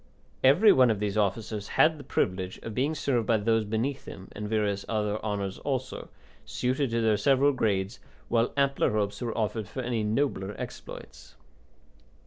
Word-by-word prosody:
Every 170 +12 +7
one 130 -2 +5
of 110 -3 0
these 105 -1 -2
officers 105 0 -1
had 160 -1 +5
the - - -9
privilege 95 -7 -1
of 115 - -5
being 140 +7 0
served 125 -7 0
by 115 - +4
those 110 +1 +1
beneath 115 +6 -2
him, 95 - -10
and 105 0 -6
various 105 -2 0
other 105 -1 -1
honours 100 -3 -3
also, 130 -2 -4 0.3
suited 130 +2 -1
to 115 0 0
their 110 -2 +3
several 135 +6 +4
grades, 105 -4 -1 0.3
while 115 0 +1
ampler 140 -4 +2
hopes 105 0 -1
were 120 -2 -3
offered 110 -1 -1
for 130 - -5
any 120 -2 -1
nobler 105 -3 -1
exploits. - - -9
110 Hz, 165 wpm, -28 LUFS, 105-130 Hz, 0.3 s, Every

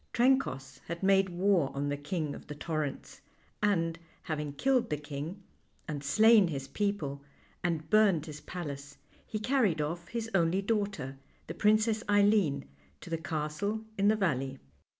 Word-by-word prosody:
Trencoss 235 - +1
had 170 +2 -5
made 195 0 +4
war 180 -4 +2
on 140 +1 -1
the 145 - 0
King 145 +1 -3
of - - -10
the 150 - -6
Torrents, 155 -2 -4 0.4
and, 165 -5 +1 0.2
having 150 -3 -3
killed 260 - +2
the 150 - 0
king, 150 +6 -6 0.4
and 145 -3 -4
slain 215 +5 +6
his 135 -4 -4
people, 150 -5 -2 0.4
and 165 -3 -1
burned 200 -8 +4
his 155 -2 -8
palace, 145 -5 -7 0.3
he 215 - -3
carried 215 - +2
off 170 +3 -3
his 230 -1 -3
only 175 0 +3
daughter, 195 - -2 0.3
the - - -6
Princess 215 +1 +3
Eileen, 205 - +3 0.3
to - - -11
the 165 - +1
castle 160 +7 -2
in 200 0 +2
the 215 - +5
valley. 135 -9 -1
170 Hz, 150 wpm, -31 LUFS, 150-205 Hz, 0.4 s, slain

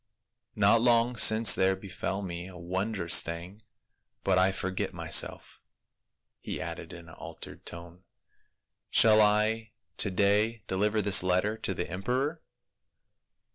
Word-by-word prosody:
Not 105 +3 +3
long 120 0 +2
since 110 0 +5
there 95 0 +1
befell 95 +1 -6
me 85 -1 -7
a 95 -1 -12
wondrous 95 +1 +1
thing 85 +5 -8 0.3
— - - -53
but 95 -1 +2
I 95 +1 +3
forget 95 -1 -4
myself," - - 0 0.8
he - - -6
added - - -7
in 85 -1 -12
an 85 - -14
altered - - -11
tone. 85 +2 -10 0.4
" - - -56
Shall 110 -1 +6
I 110 +1 0 0.2
to 100 - +2
day 105 +3 0
deliver 105 +3 -1
this 100 -2 +5
letter 95 +4 0
to 95 - -3
the 90 - -4
emperor?" 130 - -3
100 Hz, 135 wpm, -28 LUFS, 90-110 Hz, 0.8 s, Shall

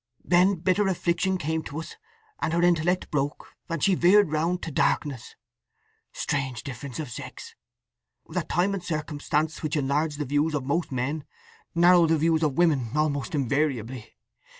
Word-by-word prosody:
Then 185 +3 +4
bitter 185 +4 +1
affliction 185 +1 0
came 160 -1 -2
to 145 - -7
us, 165 - -8 0.4
and 160 - -1
her 170 - +2
intellect 175 +1 +2
broke, 145 0 -3
and 165 -3 -2
she 195 - +4
veered 180 0 +5
round 165 +4 0
to 165 - -4
darkness. 135 -2 -1 0.8
Strange 130 -5 -2
difference 130 0 -7
of 150 -6 -5
sex, - - -8 0.7
that - - -3
time 185 +3 +1
and 195 -3 -4
circumstance, 155 -1 -2
which 155 0 -2
enlarge 145 +2 0
the 150 0 -3
views 145 +3 +1
of 135 -3 -2
most 160 +4 -1
men, 135 +4 -2 0.5
narrow 175 0 +6
the 160 0 +3
views 160 +1 +2
of 150 -4 0
women 150 -9 +2
almost 150 +2 0
invariably. 130 -4 -1
155 Hz, 155 wpm, -26 LUFS, 140-175 Hz, 0.8 s, narrow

